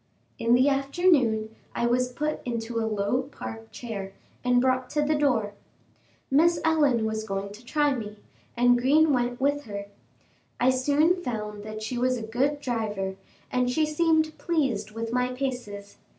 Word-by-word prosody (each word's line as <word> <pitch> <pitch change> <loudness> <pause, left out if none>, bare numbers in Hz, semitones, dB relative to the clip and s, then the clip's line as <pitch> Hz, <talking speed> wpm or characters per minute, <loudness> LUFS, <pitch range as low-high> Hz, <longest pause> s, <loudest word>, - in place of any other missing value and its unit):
In 230 +1 +4
the 255 +3 +4
afternoon 275 -6 +2 0.2
I 235 - 0
was 250 +1 +1
put 300 +4 -2
into 230 -1 -3
a 225 0 -1
low 210 +4 0
Park 110 - -8
chair 200 -5 -6 0.3
and 250 0 +3
brought 255 0 +1
to 295 0 0
the 300 +1 +2
door. 250 -9 +1 0.8
Miss 330 +4 +4
Ellen 290 -8 +3
was 220 0 -2
going 195 -1 -4
to 220 +3 -13
try 295 +3 +1
me, 215 -4 -6 0.4
and 245 0 +5
Green 295 +4 +4
went 245 -1 0
with 285 +1 +1
her. 200 -1 -5 0.7
I 255 +1 +4
soon 295 +7 +2
found 210 -6 -4
that 215 0 -6
she 240 +3 -3
was 255 0 +1
a 230 - -5
good 265 +6 0
driver, 210 -7 -2 0.4
and 250 0 +1
she 310 +5 +2
seemed 315 0 +2
pleased 265 -12 0
with 225 +1 -5
my 250 0 +1
paces. 245 -7 -5
245 Hz, 165 wpm, -26 LUFS, 220-285 Hz, 0.8 s, and